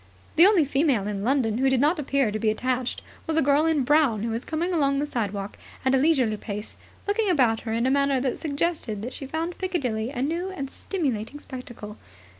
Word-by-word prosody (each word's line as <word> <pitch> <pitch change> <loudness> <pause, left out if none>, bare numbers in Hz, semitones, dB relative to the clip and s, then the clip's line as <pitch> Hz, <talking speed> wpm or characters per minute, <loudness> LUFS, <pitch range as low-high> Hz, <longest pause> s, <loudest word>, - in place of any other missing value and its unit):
The 340 +4 +8
only 385 -7 +4
female 275 -6 +1
in 205 -1 -3
London 240 -3 +1
who 265 +1 +3
did 265 -1 +2
not 305 +5 +3
appear 275 -5 +1
to 215 - -3
be 220 - +2
attached 250 +3 -1 0.2
was 320 0 0
a - - +5
girl 290 +3 +3
in 310 -4 +2
brown 270 -6 +3
who 230 - -1
was 230 +3 -3
coming 340 +3 -2
along 280 -4 +2
the 290 - 0
sidewalk 205 -7 -3 0.3
at 260 - +3
a - - +5
leisurely 260 -8 +2
pace, 210 0 -6 0.3
looking 410 0 +1
about 250 -10 +3
her 225 - -5
in 230 +2 0
a 260 - +3
manner 280 -1 +2
that 255 -1 -2
suggested 285 -8 -2
that 245 - -5
she 275 - -7
found 325 +4 -3
Piccadilly 250 - -1
a 265 -2 -3
new 340 +6 -1
and 275 -8 -5
stimulating 280 - -3
spectacle. 240 -6 -9
270 Hz, 215 wpm, -25 LUFS, 230-310 Hz, 0.3 s, The